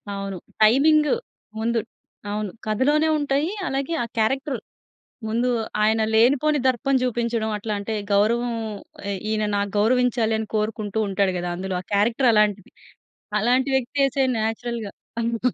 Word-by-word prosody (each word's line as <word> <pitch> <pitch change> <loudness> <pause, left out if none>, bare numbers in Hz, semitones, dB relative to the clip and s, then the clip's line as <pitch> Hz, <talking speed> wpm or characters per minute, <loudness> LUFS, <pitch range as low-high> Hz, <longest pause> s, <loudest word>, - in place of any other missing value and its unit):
అవును. 195 -1 -4 0.3
టైమింగు 300 +7 +5 0.5
ముందు. 230 +1 +1 0.5
అవును. 210 -2 -3
కథలోనే 290 +9 +2
ఉంటాయి 290 +3 0 0.2
అలాగే 275 +4 -2
ఆ - - -2
క్యారెక్టర్. 265 +4 0 0.7
ముందు 235 +3 0 0.3
ఆయన 220 +1 +3
లేనిపోని 280 +6 +4
దర్పం 260 +2 +1
జూపించడం, 235 -2 -1
అట్లాంటే 210 0 -3 0.2
గౌరవం 235 +4 +2 0.6
ఎ - - -1 0.2
ఈయన 215 -1 0
నా 200 - +1 0.2
గౌరవించాలని 225 -1 +2
కోరుకుంటూ 215 0 -1
ఉంటాడు 195 -1 +1
గదా 175 0 -3
అందులో. 190 +1 -4
ఆ - - -19
క్యారెక్టర్ 230 +6 +2
అలాంటిది. 210 -2 +1 0.7
అలాంటి 250 +5 +2
వ్యక్తే 265 +2 +1
చే 275 - +3
నేచురల్‌గా. 225 0 -3 0.3
అవును. 230 0 -1
230 Hz, 125 wpm, -23 LUFS, 215-260 Hz, 0.7 s, టైమింగు